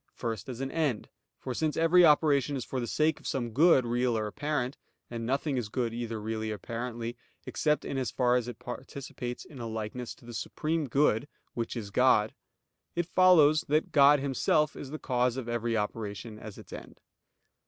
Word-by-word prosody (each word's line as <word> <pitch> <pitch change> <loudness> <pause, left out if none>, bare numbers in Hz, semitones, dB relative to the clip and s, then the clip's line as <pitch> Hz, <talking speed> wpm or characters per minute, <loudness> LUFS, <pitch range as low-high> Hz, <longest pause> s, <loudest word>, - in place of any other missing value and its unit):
First 115 -1 -4
as 125 0 -6
an 135 0 -3
end. 150 -9 -1 0.3
For 130 - -5
since 155 +3 -1
every 165 +2 +5
operation 145 -3 +4
is 130 - -4
for 130 - -3
the 120 - -3
sake 155 +4 +1
of - - -9
some 120 -3 -2
good, 140 0 +5
real 120 0 +1
or 110 - -1
apparent; 140 +2 -2 0.4
and 115 -1 -4
nothing 140 +2 0
is 115 -4 -2
good 120 -1 -1
either 115 -1 -4
really 110 +1 -3
or - - -2
apparently, 115 +1 -5 0.3
except 150 -1 0
in 135 - -2
as 130 - -1
far 125 -1 +2
as 125 -1 0
it 120 -3 -6
participates 125 0 -7
in 140 - -12
a 115 - -4
likeness 110 +2 -5
to - - -19
the 120 - -9
Supreme 155 +6 -2
Good, 135 -1 +2 0.3
which 115 +1 -3
is 105 -3 -6
God; 110 -2 +4 0.6
it 175 0 0
follows 160 -4 +5
that 155 +2 +1
God 145 0 +6
Himself 140 +2 +1
is 140 - -7
the 155 - -5
cause 125 -3 0
of 130 -3 -4
every 120 -1 -1
operation 105 0 -4
as 110 -2 -9
its - - -12
end. - - -10
125 Hz, 195 wpm, -29 LUFS, 115-145 Hz, 0.6 s, God